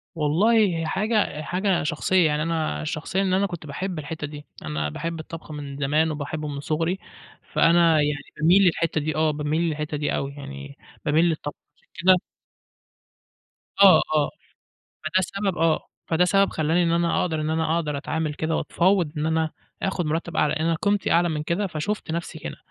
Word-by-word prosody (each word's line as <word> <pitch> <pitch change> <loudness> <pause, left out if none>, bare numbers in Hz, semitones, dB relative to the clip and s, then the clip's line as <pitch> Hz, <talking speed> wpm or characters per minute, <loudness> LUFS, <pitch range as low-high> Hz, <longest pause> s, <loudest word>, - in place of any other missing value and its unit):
والله 165 +9 +2 0.3
هي 165 - -2
حاجة 210 -5 0
حاجة 180 +3 0
شخصية، 165 +4 +2
يعني 150 0 0
أنا 160 - -1
شخصيًا 155 - -2
إن 190 -2 +1
أنا 195 +2 +3
كنت 175 -4 -7
باحِب 175 +4 -4
الحتّة 150 0 -5
دي، 150 0 -10 0.2
أنا 75 0 -2
باحِب 165 - -4
الطبخ 160 0 -9
من 140 -2 -6
زمان 150 +3 +1
وباحِبه 150 +1 -4
من 140 -1 -5
صغري، 165 +6 -1 0.5
فأنا 170 0 +5
يعني 145 -1 0 0.2
بامِيل 175 +5 +6
للحتّة 165 -3 +1
دي. 155 +1 -2
آه، 155 0 +2
بامِيل 150 +2 -1
للحتّة 150 -2 -2
دي 145 0 -1
أوي 140 0 -3
يعني، 70 - -9 0.3
بامِيل 155 +3 +3
للطبخ 155 -3 -2 0.3
عشان - - -35
كده 185 0 +7 1.7
آه 195 -2 +8
آه، 150 -1 +2 0.8
فده 185 +4 +1
سبب 195 +1 -2
آه، 165 -1 +1 0.2
فده 170 +2 +3
سبب 195 +1 +3
خلَّاني 160 +3 +1
إن 165 - +1
أنا 170 0 +2
أقدَر 160 -3 -1
إن 155 - -1
أنا 160 +1 +1
أقدَر 150 -4 -1
أتعامَل 155 +1 -2
كده، 160 +1 -1
واتفاوَضت 175 -3 +1
إن 150 +1 -1
أنا 160 0 +1 0.3
آخُد 185 -4 -1
مرتَّب 165 +2 -2
أعلى، 150 - +3
لأن 155 - -2
أنا 165 0 +2
قيمتي 205 -1 +1
أعلى 175 +1 +4
من 155 -2 -2
كده، 170 +6 -1
فشُفت 185 +2 -3
نفْسي 170 0 -4
كده. - - -7
160 Hz, 180 wpm, -24 LUFS, 150-175 Hz, 1.7 s, آه